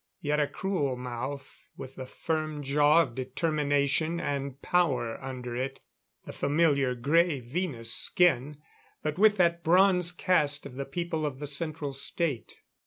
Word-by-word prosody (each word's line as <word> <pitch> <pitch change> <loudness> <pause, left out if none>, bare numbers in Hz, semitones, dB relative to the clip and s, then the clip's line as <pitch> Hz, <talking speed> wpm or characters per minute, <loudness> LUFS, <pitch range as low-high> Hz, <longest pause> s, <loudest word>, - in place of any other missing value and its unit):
Yet 150 0 0
a 145 - +2
cruel 180 -10 -2
mouth, 130 +3 -7
with 130 0 -8
the 130 -1 -7
firm 155 0 -3
jaw 145 +4 +4
of 120 - -8
determination 145 +4 0
and 140 -3 -3
power 135 -12 0
under 125 -2 -6
it. 135 +2 -3 0.5
The - - -8
familiar 140 -4 +1
gray 150 +5 +2
Venus 120 -3 -3
skin, 150 -5 +2 0.5
but 155 +3 -3
with 210 0 +5
that 170 -1 +2
bronze 180 0 +4
cast 150 -5 +2
of 140 - -9
the 135 +2 -5
people 165 +2 -3
of 145 -3 -3
the 145 - -6
Central 145 0 -3
State. 140 -1 -3
145 Hz, 145 wpm, -28 LUFS, 135-170 Hz, 0.5 s, with